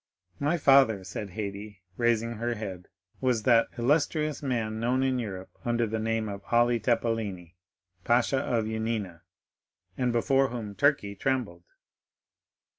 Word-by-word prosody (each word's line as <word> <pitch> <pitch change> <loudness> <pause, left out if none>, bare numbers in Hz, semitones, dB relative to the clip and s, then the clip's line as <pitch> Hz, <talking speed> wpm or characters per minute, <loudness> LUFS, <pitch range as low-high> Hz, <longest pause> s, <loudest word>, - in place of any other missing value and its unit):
My 150 +5 +1
father," 135 - +5
said 100 +2 -6
Haydée, 100 -1 -6
raising 115 0 +1
her 120 +1 -2
head, 95 -5 -7 0.3
"was 125 -4 +1
that 115 -1 +5
illustrious 150 +3 +1
man 115 -5 -2
known 125 +3 +1
in 130 -1 +1
Europe 95 -5 -6
under 120 0 +1
the 110 0 -3
name 110 0 -1
of 100 -1 -6
Ali 120 0 +4
Tepelini, 110 -6 -1 0.5
pasha 120 +4 +2
of 120 -4 0
Yanina, 110 -5 -3 0.7
and 125 -1 0
before 135 +3 +2
whom 115 -4 -5
Turkey 140 -5 +2
trembled." 100 -8 -2
115 Hz, 130 wpm, -28 LUFS, 105-125 Hz, 0.7 s, father